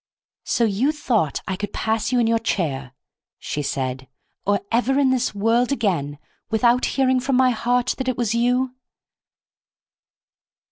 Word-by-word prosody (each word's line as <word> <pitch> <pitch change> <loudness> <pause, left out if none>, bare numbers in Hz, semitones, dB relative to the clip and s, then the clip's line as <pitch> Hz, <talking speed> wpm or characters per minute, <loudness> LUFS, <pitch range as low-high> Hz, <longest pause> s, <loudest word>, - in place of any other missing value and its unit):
"So 235 - +1
you 225 +7 +2
thought 230 - 0
I 190 - -1
could 205 +2 -5
pass 220 +2 -1
you 250 - +2
in 235 - +3
your 230 0 +2
chair," 140 - -2 0.4
she 150 - -4
said, 130 -2 -3 0.4
"or 200 0 +2
ever 250 +3 +2
in 275 -2 +3
this 255 -4 0
world 230 +5 +2
again, 175 - -1 0.3
without 235 +3 +3
hearing 260 -1 +3
from 260 +1 0
my 255 0 +4
heart 245 +2 0
that 260 - -3
it 255 - -1
was 235 -3 0
you!" 250 +2 +1
230 Hz, 150 wpm, -22 LUFS, 200-255 Hz, 0.4 s, my